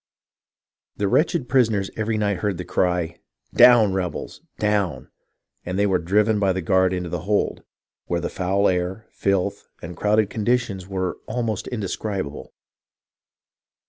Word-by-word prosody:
The 100 - 0
wretched 150 - +1
prisoners 110 -6 +2
every 110 0 -1
night 100 -2 0
heard 100 -2 -2
the 90 - -5
cry, 90 -1 0 0.2
" - - -47
Down, 115 -5 +7
rebels! 95 -2 -4 0.2
down! 105 -3 -1 0.3
" - - -53
and 90 +1 -4
then 100 0 +2
were 90 - +3
driven 105 +5 +2
by 100 -2 +2
the 95 - -2
guards 95 +1 +3
into 90 -1 -4
the 90 - -3
hold, 100 +5 -1 0.5
where 85 - 0
the 85 - -2
foul 95 +2 +1
air, 90 +4 -1
filth, 100 0 -1
and 85 +1 -8
crowded 105 +3 +2
conditions 110 -4 -1
were 95 -2 -3
almost 115 -4 -2
indescribable. 100 - -4
100 Hz, 145 wpm, -23 LUFS, 90-105 Hz, 0.5 s, Down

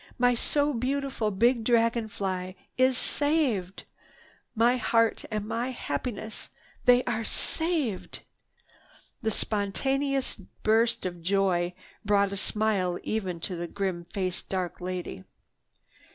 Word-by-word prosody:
My 245 0 +4
so 290 +4 +1
beautiful 265 -2 -1
big 230 +4 +3
dragon 230 -1 +3
fly 185 -3 -3 0.2
is 255 0 +4
saved! 265 - 0 0.7
My 235 +3 +4
heart 230 -1 +2
and 215 -2 -2
my 230 +3 -1
happiness, 220 - -4 0.4
they 245 0 +6
are 230 -2 -1
saved!" 310 - -2 1.0
This 220 -3 0
spontaneous 270 +7 0
burst 220 +4 +1
of 175 -2 -4
joy 180 -1 +1 0.3
brought 200 -1 +3
a - - -2
smile 200 -4 +1
even 190 -6 -2
to 185 - -2
the 170 0 -4
grim 185 -2 -2
faced 185 0 -3
dark 185 -2 -2
lady. 180 - -4
220 Hz, 115 wpm, -28 LUFS, 185-245 Hz, 1.0 s, they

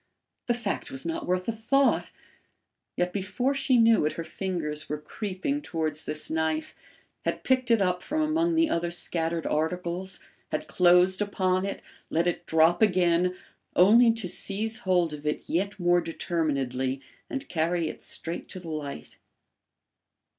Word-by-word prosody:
The 240 - +2
fact 235 -4 -3
was 135 0 -5
not 165 -1 -3
worth 180 0 0
a - - +2
thought; 250 +5 +2 0.9
yet 180 0 0
before 210 +7 -1
she 275 -2 +2
knew 230 -4 +5
it, 150 - 0
her 165 - -5
fingers 160 -5 -3
were 150 - -1
creeping 210 - -3
towards 155 - -3
this 155 0 -2
knife, 160 0 -1 0.5
had - - -2
picked 255 -2 +1
it 230 -4 +4
up 180 -1 0
from 310 +2 -1
among 330 +2 +1
the 325 0 +4
other 170 - 0
scattered 170 -1 -1
articles, 175 +4 -2 0.3
had - - -2
closed 180 +2 +4
upon 190 -2 +1
it, 195 - -5 0.3
let 165 +2 +1
it 175 0 -2
drop 160 +3 +4
again, 180 -3 +3 0.4
only 230 +6 +7
to 225 -5 -4
seize 210 +5 -1
hold 180 -4 +1
of 150 0 -6
it 150 - -2
yet 200 +4 -1
more 175 0 +3
determinedly 140 -6 -1 0.3
and 275 0 -4
carry 170 0 0
it - - -7
straight 170 +1 -5
to 185 - -7
the 170 -2 -9
light. 145 - -6
180 Hz, 155 wpm, -27 LUFS, 160-210 Hz, 0.9 s, only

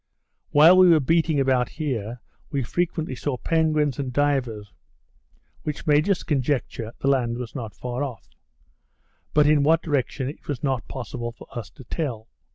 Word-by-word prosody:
While 160 +5 +7
we 185 -1 +7
were 165 -2 +6
beating 160 +1 +2
about 130 -3 +2
here; 125 -7 -4 0.3
we 140 -2 -1
frequently 160 +2 -2
saw 130 +1 -3
penguins 155 -2 +1
and 135 -2 -2
divers, 125 -7 -1 0.9
which 150 -2 -5
made 150 +4 +3
us 195 - +1
conjecture 130 -5 -1
the - - -1
land 120 -4 +2
was 125 -2 -6
not 115 -6 -6
far 125 +2 -3
off; 125 -8 -6 1.1
but 150 -1 +6
in 150 -1 +4
what 160 +3 +3
direction 140 -3 -1
it 145 - -8
was 145 -4 -4
not 130 -5 -1
possible 120 -2 -5
for 115 - -14
us 115 -5 -5
to 110 - -14
tell. 120 -5 -4
135 Hz, 165 wpm, -24 LUFS, 120-150 Hz, 1.1 s, While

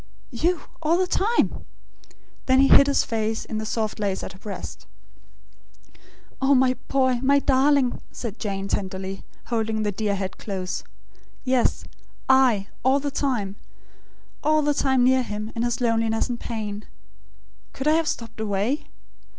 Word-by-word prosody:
You 325 +7 0 0.2
all 325 +2 +3
the 370 - +2
time?" 425 +5 +1 0.8
Then 260 0 +5
he 275 - +5
hid 280 - +8
his 280 - +3
face 220 -1 -2
in 215 - -4
the 215 - -4
soft 215 -2 -2
lace 200 -2 -1
at - - -6
her 190 - -15
breast. 200 -2 -8 1.5
"Oh, 275 +1 +4
my 255 0 +4
boy, 260 -2 +2
my 280 +1 +4
darling!" 275 -1 +3
said 230 -3 -6
Jane, 195 -2 -3
tenderly; 190 -1 -3 0.3
holding 220 -1 0
the 205 - 0
dear 205 0 -1
head 190 -1 -5
close. 190 -3 -4 0.6
"Yes; 255 -2 +1 0.4
I, 255 -7 +4 0.2
all 265 +2 +4
the 285 0 -3
time; 235 -9 -1 0.9
all 310 0 +3
the 295 0 +2
time 265 -3 +2
near 260 +1 +4
him, 215 -2 -5
in 230 - -2
his 240 0 0
loss 225 -1 +1
and 240 -1 -3
pain. 215 -2 -5 0.8
Could 270 - -4
I - - +6
have 325 0 +2
stopped 230 -5 -4
away? 215 +6 -1
235 Hz, 150 wpm, -24 LUFS, 210-270 Hz, 1.5 s, hid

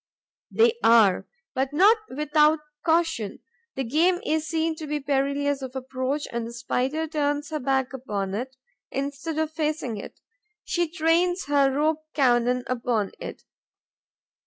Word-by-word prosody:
They 465 +1 +3
are, 220 -5 +5 0.3
but 265 +2 -1
not 400 +9 +6
without 300 +2 +3 0.3
caution. 325 - +1 0.4
The 270 - -1
game 330 +9 +2
is 315 -3 0
seen 325 +1 0
to 310 - -6
be 300 0 -1
perilous 280 0 0
of 260 0 -7
approach 265 +2 -3
and 235 -1 -3
the 235 - -8
Spider 255 +6 -1
turns 290 -2 -1
her 305 - -2
back 265 0 0
upon 205 -7 -3
it, 255 +5 -4 0.3
instead 280 +3 -4
of 315 -1 0
facing 305 -7 -2
it; 200 - -9 0.4
she 345 -1 0
trains 345 +2 +1
her 280 -1 +3
rope 310 +3 0
cannon 250 -2 +3
upon 240 -5 -1
it. - - -8
285 Hz, 140 wpm, -25 LUFS, 255-315 Hz, 0.4 s, not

